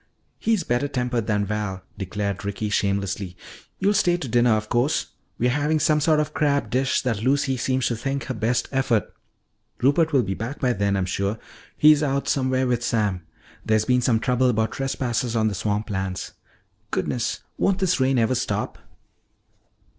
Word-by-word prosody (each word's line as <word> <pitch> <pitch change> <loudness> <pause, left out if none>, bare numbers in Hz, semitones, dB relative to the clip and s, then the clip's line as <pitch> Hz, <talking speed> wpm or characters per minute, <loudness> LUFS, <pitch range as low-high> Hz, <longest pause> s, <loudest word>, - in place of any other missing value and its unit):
"He's 220 -6 +1
better 120 +1 0
tempered 125 -4 -2
than 105 -2 +1
Val," 100 -2 -3
declared 100 +1 -3
Ricky 100 +1 -3
shamelessly. 100 -2 -1 0.4
"You'll 200 +2 +2
stay 175 -3 +3
to 145 - -5
dinner 120 0 +3
of 110 0 -2
course. 125 +6 +1 0.3
We're 125 +1 +2
having 150 +3 +1
some 155 0 +3
sort 155 0 +3
of 150 0 -1
crab 140 -7 +1
dish 130 +2 +1
that 115 -5 -1
Lucy 135 +2 +1
seems 130 +1 0
to 120 - 0
think 135 +3 -3
her 130 - -4
best 115 +2 0
effort. 135 -5 0 0.7
Rupert 155 +5 +3
will 135 -4 +3
be 95 -2 -2
back 115 +8 -5
by 125 -2 +2
then, 100 -2 0
I'm 95 - 0
sure; 100 +3 -1 0.4
he's 150 -1 +6
out 140 -2 0
somewhere 130 -1 +1
with 120 -1 0
Sam. 105 -8 -1 0.4
There's 110 0 +2
been 125 -1 +3
some 115 -2 +2
trouble 125 +2 +2
about 110 -2 +1
trespassers 125 -3 -2
on 110 -1 +2
the - - -4
swamp 105 +2 -2
lands. 95 -2 -3 0.6
Goodness, 120 - -2 0.2
won't 195 -1 +2
this 190 -5 +1
rain 130 0 +2
ever 115 +2 +2
stop?" - - -2
120 Hz, 175 wpm, -24 LUFS, 105-135 Hz, 0.7 s, he's